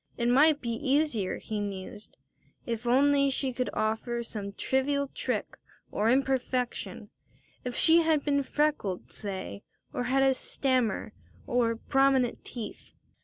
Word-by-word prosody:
It 235 0 +1
might 295 +4 +5
be 235 - -2
easier, 260 -4 +1
he 215 -1 -4
mused, 205 +1 -6 0.5
if 235 0 -3
only 280 +2 +4
she 265 -1 -1
could 250 +1 -1
offer 230 +2 -1
some 205 -3 -6
trivial 280 +4 0
trick - - -3 0.3
or 215 +2 +1
imperfection, 255 -1 -1 0.5
if 250 -1 -4
she 330 0 +5
had 320 -3 +2
been 280 -1 +2
freckled, 280 -9 -1
say, 190 - -5 0.3
or 245 - -2
had 270 +2 +3
had 270 - +5
a - - +2
stammer, 255 -5 -1 0.3
or 235 -2 +1
prominent 270 0 +2
teeth. 230 -4 -8
250 Hz, 135 wpm, -29 LUFS, 225-275 Hz, 0.5 s, might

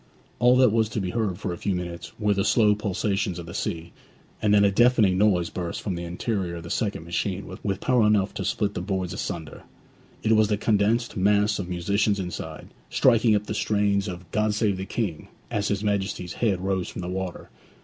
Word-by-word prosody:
All 125 +1 +5
that 130 -3 +5
was 110 -1 +2
to 110 - -3
be 95 -2 -2
heard 110 -6 -1
for 90 - -3
a 85 - -8
few 100 -2 -1
minutes 85 -1 -5
were 105 -1 +2
the 100 -1 0
slow 105 -1 +4
pulsations 100 -3 -1
of 85 - -6
the 85 - -9
sea; 85 -3 -4 0.5
and 105 - +2
then 100 0 +6
a 100 - +4
deafening 115 -3 +4
noise 95 -4 +2
burst 85 -2 -4
from 100 - -3
the 85 0 -4
interior 90 0 -2
of 85 - -7
the 85 - -7
second 105 -7 -1
machine 90 +3 -2 0.2
with 95 -2 -2
power 125 -4 +3
enough 105 -2 +2
to 95 - -4
split 100 +2 -1
the - - -3
boards 95 -3 -2
asunder; 85 -5 -5 0.6
it 110 - +2
was 110 -1 +5
the 105 0 0
condensed 110 +4 +1
mass 105 +2 +3
of 90 -2 -4
musicians 100 +4 +1
inside, 90 -2 -6 0.2
striking 115 -3 +4
up 105 0 -1
the - - -4
strains 105 -1 +1
of 90 -2 -7
'God 105 0 +1
save 105 -3 +1
the 95 +1 -5
King,' 100 -10 -3 0.2
as 105 0 0
his 100 0 -1
Majesty's 95 -4 -1
head 100 -6 +1
rose 95 -1 -1
from 90 - -6
the - - -4
water. 95 -1 -5
100 Hz, 210 wpm, -25 LUFS, 90-105 Hz, 0.6 s, then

